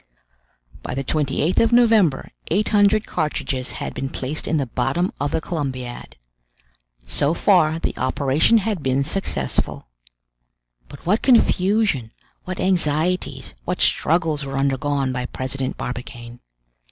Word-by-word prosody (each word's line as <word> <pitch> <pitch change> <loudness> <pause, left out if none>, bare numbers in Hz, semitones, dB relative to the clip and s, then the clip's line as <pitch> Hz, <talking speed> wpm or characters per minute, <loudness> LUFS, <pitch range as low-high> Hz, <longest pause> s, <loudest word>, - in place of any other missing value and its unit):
By - - -5
the 135 - -2
28th 150 +4 0
of 230 0 +3
November 220 - +4 0.2
eight 200 +6 +1
hundred 210 0 +4
cartridges 135 -4 -2
had - - -5
been 135 - -4
placed 135 +5 -4
in 160 - +1
the 140 - 0
bottom 135 +9 -1
of 145 - +1
the - - 0
Columbiad. 130 -7 -5 0.9
So 145 - 0
far 165 -5 +3
the - - -2
operation 140 - +3
had 210 -4 -1
been 135 0 +1
successful! 195 +7 -3 1.0
But 140 - -13
what 205 +6 +2
confusion, 195 - +2 0.3
what 185 0 -5
anxieties, 180 -1 0
what - - -2
struggles 160 -2 +1
were 135 0 -4
undergone 135 0 0
by 125 0 -3
President 130 0 -4
Barbicane! 120 -1 -7
150 Hz, 130 wpm, -22 LUFS, 135-185 Hz, 1.0 s, November